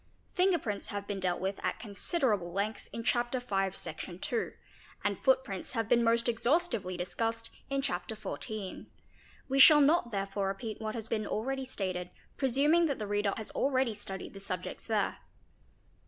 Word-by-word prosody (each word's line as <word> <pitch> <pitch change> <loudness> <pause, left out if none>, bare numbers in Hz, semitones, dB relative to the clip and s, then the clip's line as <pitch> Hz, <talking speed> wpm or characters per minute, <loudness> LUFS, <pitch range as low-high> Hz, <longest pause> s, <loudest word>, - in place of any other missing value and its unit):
Finger 365 -1 +4
prints 210 -9 -3
have 205 0 -4
been 200 -1 -3
dealt 180 -2 0
with 190 +1 -2
at - - 0
considerable 210 - 0
length 205 +4 -2
in 230 - -5
Chapter 240 +2 +1
V., 195 -5 0
Section 180 -2 -6
11. 235 - -1 0.5
and - - 0
footprints - - +1
have 225 -3 0
been 235 0 +4
most 230 +1 +3
exhaustively 235 - +1
discussed 225 +5 -2 0.2
in 275 0 0
Chapter 180 -4 -2
XIV.; 215 -2 -5 0.6
we 270 +1 +1
shall 295 +2 +10
not 295 -2 +4
therefore 195 -1 -1
repeat 215 +3 -4
what 215 +1 -3
has 225 -1 -4
been 215 -2 -1
already 265 +4 -2
stated, 185 -7 -3 0.3
presuming 290 +6 +4
that 280 - -1
the 215 - -3
reader 205 -1 +1
has 220 - -5
already 260 -4 +1
studied 195 -2 -7
the 195 - -8
subjects 185 -2 -5
there. 215 -3 0
220 Hz, 165 wpm, -31 LUFS, 195-260 Hz, 0.6 s, shall